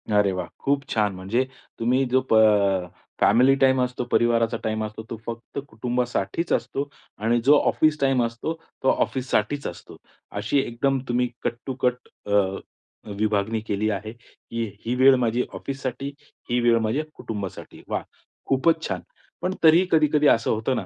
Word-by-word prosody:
अरे 100 -1 +4
वाह! 90 - -3
खूप 140 0 0
छान. 105 -3 +1
म्हणजे 105 +8 0 0.3
तुम्ही 125 +4 +2
जो 130 +1 +4
प - - +3
अ 100 -4 +4 0.3
फॅमिली 130 +3 +5
टाईम 130 -1 +4
असतो, 125 0 -1
परिवाराचा 115 0 +2
टाईम 110 0 -1
असतो, 110 +1 -7
तो 115 - -4
फक्त 115 +4 -6
कुटुंबासाठीच 120 - -2
असतो. 140 +1 -1 0.3
आणि 115 +3 +1
जो 145 +1 +7
ऑफिस 155 -1 +2
टाईम 135 -2 +3
असतो 115 +7 -3 0.3
तो 130 - +4
ऑफिससाठीच 130 +1 0
असतो. 85 - -9 0.4
अशी 105 +7 0
एकदम 135 +2 0
तुम्ही 125 +1 +1 0.2
कट-टू-कट 125 +1 -2 0.2
अ, 100 -1 +2 0.6
विभागणी 110 +1 +1
केली 105 +1 0
आहे, 110 +1 -3
की 115 0 -7 0.2
ही 120 +2 0
वेळ 130 +1 +6
माझी 120 0 +1
ऑफिससाठी, 135 0 -4 0.4
ही 120 +1 +2
वेळ 120 -1 +4
माझ्या 110 +7 0
कुटुंबासाठी. 100 -4 -7
वाह! - - -2 0.4
खूपच 160 +5 +2
छान. - - -3 0.4
पण 185 - -1
तरीही, 165 +3 +7
कधी-कधी 150 -2 +4
असं 115 - +3
होतं 110 +4 0
ना, 100 - -3
120 Hz, 155 wpm, -24 LUFS, 110-135 Hz, 0.6 s, जो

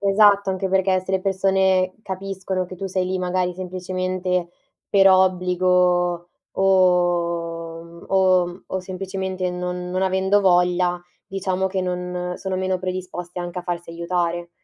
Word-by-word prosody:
Esatto, 200 0 +4
anche 190 0 -2
perché 190 0 +2
se 190 +1 -6
le 190 - +2
persone 190 -1 +2
capiscono 190 -1 -3
che 185 - -9
tu 195 - -4
sei 185 -1 -1
lì 185 0 -1
magari 180 0 -1
semplicemente 185 -1 -2 0.4
per 195 -1 +6
obbligo 180 -1 +2 0.2
o 170 -3 +1
mhmm, 170 0 -14
o 185 -2 +4
mhmm, 175 +2 -9
o 190 - -3
semplicemente 190 0 -4
non 180 0 -4
non 185 +1 -1
avendo 190 +2 +2
voglia, 180 -1 +2 0.2
diciamo 190 -1 -2
che 190 0 -2
non 180 0 -3
sono 190 -1 -3
meno 185 0 -1
predisposte 180 -1 -5
anche 175 0 -4
a - - -13
farsi 175 -1 -4
aiutare. 170 0 -2
185 Hz, 145 wpm, -22 LUFS, 180-190 Hz, 0.4 s, per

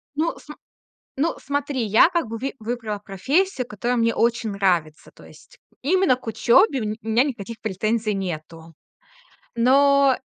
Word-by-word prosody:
Ну, 325 +3 0
см 300 - -12 0.6
ну, 325 +4 +1
смотри, 285 -2 -3
я 220 - +5
как 340 -8 -1
бы 225 +1 -5
ви 270 +4 -4
выбрала 220 -2 -4
профессию, 260 - -1
которая 240 +2 -2
мне 230 0 +2
очень 235 -1 0
нравится. 175 -6 -1
То - - -16
есть - - -18 0.2
именно 350 -2 +2
к 245 - -17
учёбе 260 - +3
у - - -3
ме 210 +1 -3
у 220 - -12
меня 230 +4 +3
никаких 230 -5 -5
претензий 215 +1 -1
нету. 165 -3 -6 0.8
Но 275 +2 +4
235 Hz, 155 wpm, -22 LUFS, 210-280 Hz, 0.8 s, я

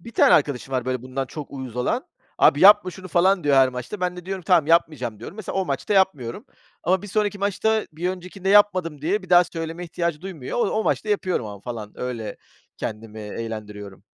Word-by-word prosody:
1 230 +7 -11
tane - - +5
arkadaşım 140 -3 0
var 125 -2 0
böyle 130 -1 -2
bundan 130 +1 -4
çok 150 +2 -8
uyuz 130 -4 -7
olan. 125 - -1 0.3
"Abi 145 - +5
yapma 200 0 +7
şunu!" 185 +1 -10
falan 185 0 +3
diyor 145 -1 +4
her 135 -1 +6
maçta. 125 - -6
Ben 180 0 -1
de 180 - -9
diyorum, 190 -1 -4
"Tamam, 175 -5 +4
yapmayacağım." 150 -9 +1
diyorum. 155 - -9
Mesela 215 -4 -5
o 190 - +1
maçta 140 +6 -2
yapmıyorum 150 -12 +1 0.4
ama 185 +2 +1
bir - - -7
sonraki 205 0 -1
maçta 210 +2 0
bir 170 +4 -2
öncekinde 185 +1 -6
yapmadım 185 -7 +4
diye 195 +6 0
bir 185 - -14
daha 175 0 +7
söyleme 165 0 -6
ihtiyacı 170 -2 -2
duymuyor. 180 - -5
O - - +2
o 220 0 0
maçta 215 - 0
yapıyorum 185 - 0
ama 100 -1 -9
falan 110 -2 -7
öyle 120 -4 -4 0.4
kendimi 110 0 -6
eğlendiriyorum. 105 -2 -7
165 Hz, 205 wpm, -23 LUFS, 125-190 Hz, 0.4 s, yapma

